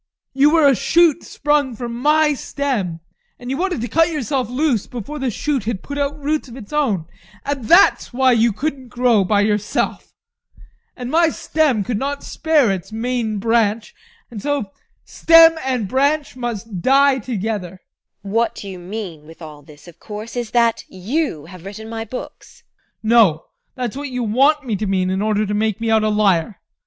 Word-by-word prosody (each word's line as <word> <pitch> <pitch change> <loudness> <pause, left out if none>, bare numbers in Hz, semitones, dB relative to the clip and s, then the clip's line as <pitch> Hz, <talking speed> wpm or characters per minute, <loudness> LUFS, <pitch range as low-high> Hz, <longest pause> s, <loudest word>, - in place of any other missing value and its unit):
You 275 +2 +4
were 315 -2 +4
a 275 - +5
shoot 335 +3 +3
sprung 290 -4 0
from 235 +1 -5
my 300 +5 +3
stem, 235 - -3 0.4
and 245 +1 -7
you 270 - -2
wanted 355 -6 -1
to 240 - -3
cut 325 +7 +3
yourself 275 -5 -2
loose 250 -4 0
before 250 +6 -7
the 265 -1 -1
shoot 265 0 -2
had 220 -4 -3
put 285 0 -5
out 285 +1 -2
roots 295 0 -2
of 245 0 -11
its 230 +1 -11
own, 225 - 0 0.4
and 275 -4 -3
that's 345 - +4
why 260 +1 +3
you 230 -1 +3
couldn't 265 +3 -4
grow 240 -4 +2
by 205 +2 +2
yourself. 210 0 -1 0.9
And 250 0 -5
my 330 0 +4
stem 295 -8 0
could 215 +1 -2
not 280 +2 -3
spare 305 -9 +2
its 190 +2 -5
main 225 -1 -2
branch 225 0 0 0.4
and 215 -4 -7
so 285 -8 -2 0.3
stem 330 0 +6
and 255 -6 -1
branch 280 +4 0
must 225 -6 -5
die 275 +3 +4
together. 205 -5 -4
TEKLA. - - -36 0.5
What 230 0 0
you 190 -2 -8
mean 175 -5 -7
with 165 - -14
all 155 -3 -11
this, 145 +3 -17
of 170 -1 -15
course, 215 +3 -8
is 240 -2 -3
that 235 0 +2
you 190 - -3
have 180 0 -12
written 205 +3 -8
my 225 0 -5
books. 250 +3 -10
ADOLPH. - - -47
No, 215 -8 +4 0.3
that's 250 -4 -4
what 285 0 -5
you 250 -1 -3
want 275 +7 +2
me 225 -4 -1
to 210 - -3
mean 185 -1 0
in 190 +1 -1
order 215 0 +1
to 205 - -3
make 215 0 0
me 225 -1 -1
out 220 -1 +3
a 215 - +2
liar. 205 -2 +1
235 Hz, 185 wpm, -19 LUFS, 210-280 Hz, 0.9 s, stem